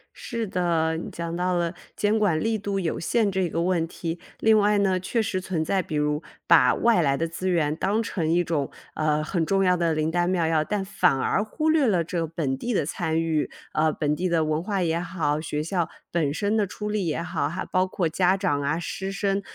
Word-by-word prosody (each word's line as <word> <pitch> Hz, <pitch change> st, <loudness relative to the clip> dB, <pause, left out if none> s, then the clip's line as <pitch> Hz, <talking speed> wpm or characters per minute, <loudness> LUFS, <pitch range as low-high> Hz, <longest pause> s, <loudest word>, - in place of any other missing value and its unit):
是 230 Hz, -1 st, -4 dB
的， 170 Hz, -3 st, 0 dB
讲 170 Hz, 0 st, -4 dB
到 180 Hz, +1 st, 0 dB
了 170 Hz, -1 st, 0 dB, 0.2 s
监 210 Hz, +1 st, +1 dB
管 175 Hz, -7 st, +2 dB
力 225 Hz, +4 st, 0 dB
度 200 Hz, -1 st, -2 dB
有 170 Hz, -4 st, -2 dB
限 210 Hz, +4 st, +1 dB
这 190 Hz, -2 st, 0 dB
个 165 Hz, -, -1 dB
问 175 Hz, -2 st, +1 dB
题， 170 Hz, 0 st, -5 dB, 0.2 s
另 220 Hz, 0 st, +5 dB
外 210 Hz, 0 st, +3 dB
呢， 190 Hz, -2 st, +2 dB
确 185 Hz, +6 st, -2 dB
实 190 Hz, -3 st, -2 dB
存 175 Hz, -4 st, -2 dB
在 190 Hz, +3 st, +1 dB
比 155 Hz, -, -6 dB
如， 150 Hz, 0 st, 0 dB, 0.2 s
把 150 Hz, -7 st, +6 dB
外 230 Hz, -5 st, +3 dB
来 140 Hz, -3 st, +2 dB
的 165 Hz, -, -1 dB
资 175 Hz, +3 st, -3 dB
源 155 Hz, -4 st, +1 dB
当 205 Hz, +7 st, 0 dB
成 165 Hz, -8 st, -1 dB
一 175 Hz, +1 st, +3 dB
种， 155 Hz, -5 st, -1 dB, 0.2 s
呃， 155 Hz, 0 st, +1 dB
很 165 Hz, +2 st, -1 dB
重 195 Hz, +4 st, +2 dB
要 180 Hz, -1 st, +4 dB
的 170 Hz, -2 st, +1 dB
灵 155 Hz, +1 st, 0 dB
丹 175 Hz, +1 st, +1 dB
妙 180 Hz, -3 st, +1 dB
药， 160 Hz, -1 st, +2 dB
但 200 Hz, +3 st, -2 dB
反 185 Hz, -6 st, +2 dB
而 190 Hz, +9 st, +1 dB
忽 305 Hz, +9 st, -1 dB
略 305 Hz, -4 st, +3 dB
了 180 Hz, -6 st, +2 dB
这 170 Hz, +2 st, -3 dB
个 165 Hz, -, -1 dB
本 150 Hz, -4 st, -2 dB
地 240 Hz, -, -3 dB
的 150 Hz, -, +1 dB
参 160 Hz, 0 st, -1 dB
与。 160 Hz, -2 st, 0 dB, 0.2 s
呃， 155 Hz, +1 st, +2 dB
本 150 Hz, -1 st, -1 dB
地 185 Hz, +3 st, -1 dB
的 165 Hz, -2 st, +2 dB
文 155 Hz, +1 st, 0 dB
化 195 Hz, -1 st, -1 dB
也 165 Hz, 0 st, 0 dB
好、 155 Hz, -4 st, -1 dB
学 150 Hz, -1 st, -3 dB
校 170 Hz, 0 st, -1 dB, 0.2 s
本 160 Hz, -5 st, +1 dB
身 205 Hz, +7 st, 0 dB
的 210 Hz, -2 st, +2 dB
出 210 Hz, +3 st, -5 dB
力 210 Hz, -4 st, -1 dB
也 160 Hz, +1 st, -1 dB
好， 145 Hz, -4 st, -1 dB
还 180 Hz, +3 st, -4 dB
包 185 Hz, 0 st, +1 dB
括 185 Hz, -2 st, -1 dB
家 180 Hz, +4 st, +2 dB
长 145 Hz, -8 st, 0 dB
啊、 145 Hz, +3 st, 0 dB
师 190 Hz, +3 st, -4 dB
生 195 Hz, 0 st, 0 dB
175 Hz, 250 characters per minute, -25 LUFS, 160-195 Hz, 0.2 s, 把